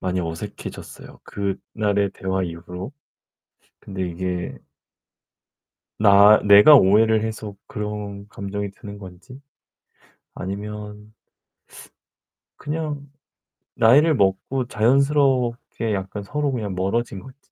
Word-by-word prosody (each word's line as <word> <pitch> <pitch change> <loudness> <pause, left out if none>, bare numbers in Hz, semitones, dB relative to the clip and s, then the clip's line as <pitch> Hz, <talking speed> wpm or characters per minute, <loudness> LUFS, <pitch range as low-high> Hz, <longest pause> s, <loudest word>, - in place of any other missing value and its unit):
많이 90 0 -1
어색해졌어요, 85 +5 -8
그날의 100 0 -2
대화 95 0 -2
이후로. 90 - -7 0.9
근데 95 -2 -5
이게 90 +1 -4 1.4
나 100 0 +7
내가 105 +9 +8
오해를 110 +1 +4
해서 110 -2 -6
그런 105 -4 -6
감정이 100 0 -5
드는 100 +1 -11
건지 95 +7 -12 0.9
아니면 105 +2 -7 1.4
그냥 150 -2 -4 0.7
나이를 145 +7 +5
먹고 105 +6 0
자연스럽게 125 -2 +1
약간 95 +1 -5
서로 145 +6 -2
그냥 105 -6 -3
멀어진 95 +2 -2
건지 130 +4 -14
105 Hz, 215 characters per minute, -22 LUFS, 95-120 Hz, 1.4 s, 내가